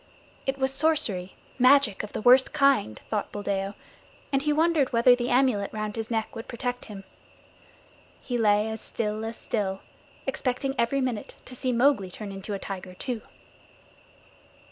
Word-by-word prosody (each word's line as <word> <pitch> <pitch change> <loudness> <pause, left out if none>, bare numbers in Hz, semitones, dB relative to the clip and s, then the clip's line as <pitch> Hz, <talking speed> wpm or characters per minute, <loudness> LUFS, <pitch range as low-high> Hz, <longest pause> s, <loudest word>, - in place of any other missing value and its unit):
It 270 0 0
was 265 0 0
sorcery, 270 - +1 0.2
magic 255 -5 +5
of 210 - -8
the - - -4
worst 255 +2 +6
kind, 275 - +3
thought 210 -2 -1
Buldeo, 200 -1 -2 0.6
and 270 - +3
he 300 +1 +1
wondered 315 -2 +2
whether 245 +1 +6
the 245 0 -2
amulet 245 -6 +2
round 215 -1 -4
his 225 -1 -4
neck 225 -1 -2
would 225 - -7
protect 245 0 -4
him. 200 -3 -9 1.2
He 250 - -4
lay 210 -2 +3
as 220 0 -5
still 215 -1 -3
as 225 0 -5
still, 195 -3 -2 0.4
expecting 270 0 -1
every 270 +3 +1
minute 245 -5 -3
to 255 - -9
see 255 +1 -1
Mowgli 240 -5 +3
turn 200 +2 -7
into 195 +1 -5
a - - -2
tiger 185 -2 -7
too. 240 +2 -4
230 Hz, 160 wpm, -27 LUFS, 205-265 Hz, 1.2 s, worst